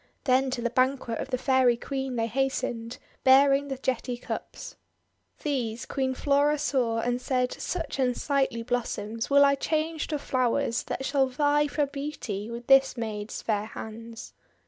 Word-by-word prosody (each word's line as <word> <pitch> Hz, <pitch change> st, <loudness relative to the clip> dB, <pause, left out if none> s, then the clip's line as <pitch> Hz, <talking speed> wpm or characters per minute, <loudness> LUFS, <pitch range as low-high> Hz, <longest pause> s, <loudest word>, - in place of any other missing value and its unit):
Then 265 Hz, 0 st, +3 dB
to 250 Hz, -2 st, -3 dB
the 240 Hz, -, 0 dB
banquet 255 Hz, -2 st, +1 dB
of -, -, -4 dB
the 255 Hz, -, 0 dB
Fairy 260 Hz, -2 st, +3 dB
Queen 265 Hz, 0 st, -4 dB
they 225 Hz, -1 st, +1 dB
hastened, 240 Hz, -2 st, -2 dB, 0.3 s
bear 275 Hz, +1 st, +7 dB
ing 280 Hz, +1 st, 0 dB
the 270 Hz, -1 st, -4 dB
jetty 250 Hz, -1 st, -2 dB
cups. -, -, -7 dB, 0.7 s
These 250 Hz, -5 st, -2 dB
Queen 260 Hz, -1 st, -1 dB
Flora 285 Hz, +2 st, +2 dB
saw, 255 Hz, -6 st, 0 dB
and 245 Hz, +1 st, -1 dB
said, 250 Hz, -1 st, 0 dB
"Such 325 Hz, -6 st, -4 dB
un 250 Hz, -2 st, +2 dB
sightly 270 Hz, -5 st, 0 dB
blossoms 230 Hz, -2 st, -3 dB
will 280 Hz, 0 st, +6 dB
I 280 Hz, -, +4 dB
change 315 Hz, +2 st, -1 dB
to 305 Hz, -, -1 dB
flowers 255 Hz, -2 st, 0 dB
that 270 Hz, -, -4 dB
shall 275 Hz, -1 st, +2 dB
vie 290 Hz, +3 st, +2 dB
for 290 Hz, 0 st, 0 dB
beauty 275 Hz, -8 st, -5 dB
with 235 Hz, +1 st, -7 dB
this 270 Hz, 0 st, +5 dB
maid's 215 Hz, -2 st, -4 dB
fair 210 Hz, -2 st, 0 dB
hands." 225 Hz, +1 st, -9 dB
260 Hz, 165 wpm, -27 LUFS, 235-280 Hz, 0.7 s, bear